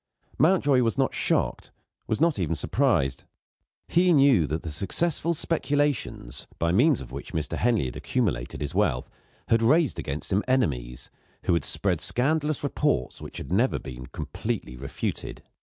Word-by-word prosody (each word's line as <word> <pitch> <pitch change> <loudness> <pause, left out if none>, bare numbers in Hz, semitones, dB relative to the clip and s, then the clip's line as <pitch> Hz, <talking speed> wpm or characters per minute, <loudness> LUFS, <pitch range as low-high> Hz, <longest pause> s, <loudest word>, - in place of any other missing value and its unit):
Mountjoy 145 -5 +4
was 115 -5 0
not - - +1
shocked, - - 0 0.4
was 110 - -1
not 165 -6 +2
even 85 -2 0
surprised. 100 - +1 0.6
He 180 +1 +3
knew 135 - +5
that 80 +5 -3
the 80 - -4
successful 165 - 0
speculations, 145 - -1
by 85 0 +1
means 130 - +4
of 65 -2 -10
which 70 +2 -8
Mr. 80 -2 -2
Henley 115 - +1
had 60 - -5
accumulated - - -2
his - - -3
wealth, 60 - 0 0.4
had 115 0 +4
raised 145 +5 +3
against 75 +6 -3
him 100 - +2
enemies, 65 - -1 0.3
who - - +2
had 85 -3 +1
spread 90 -6 +1
scandalous 150 - +1
reports 145 - 0
which - - -8
had - - -7
never 115 +8 +2
been 65 0 -8
completely 60 - -4
refuted. 70 +2 -5
115 Hz, 155 wpm, -26 LUFS, -, 0.6 s, knew